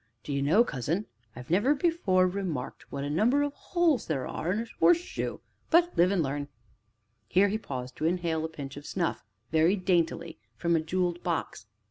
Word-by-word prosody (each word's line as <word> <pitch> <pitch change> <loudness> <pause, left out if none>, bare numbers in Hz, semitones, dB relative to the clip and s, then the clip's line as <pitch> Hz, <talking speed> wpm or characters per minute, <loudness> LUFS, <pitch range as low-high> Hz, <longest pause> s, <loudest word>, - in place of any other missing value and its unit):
D'ye 140 -1 -2
know, 165 +12 +5
cousin, 165 - -2 0.3
I 125 +1 -8
never 210 - +3
before 270 - +2
remarked 180 -8 -4
what 140 - -4
a - - -2
number 240 - +3
of 290 -1 -2
holes 335 - +1
there 135 -5 -1
are 170 - -3
in 210 +4 0
a - - -4
horseshoe 350 0 +2 0.3
but 345 +1 +4
live 175 +2 +5
and 190 -4 +1
learn!" 145 +1 -3 0.8
Here 200 +2 +4
he 215 +2 -1
paused 130 - -6
to 155 - -2
inhale 165 -2 0
a 160 - -2
pinch 140 -4 -8
of 145 - -9
snuff, 175 -3 -2 0.3
very 160 +5 +4
daintily, 175 - 0 0.2
from 170 +8 +1
a - - +3
jewelled 175 +1 -1
box. 165 -10 -3
175 Hz, 180 wpm, -28 LUFS, 155-210 Hz, 0.8 s, know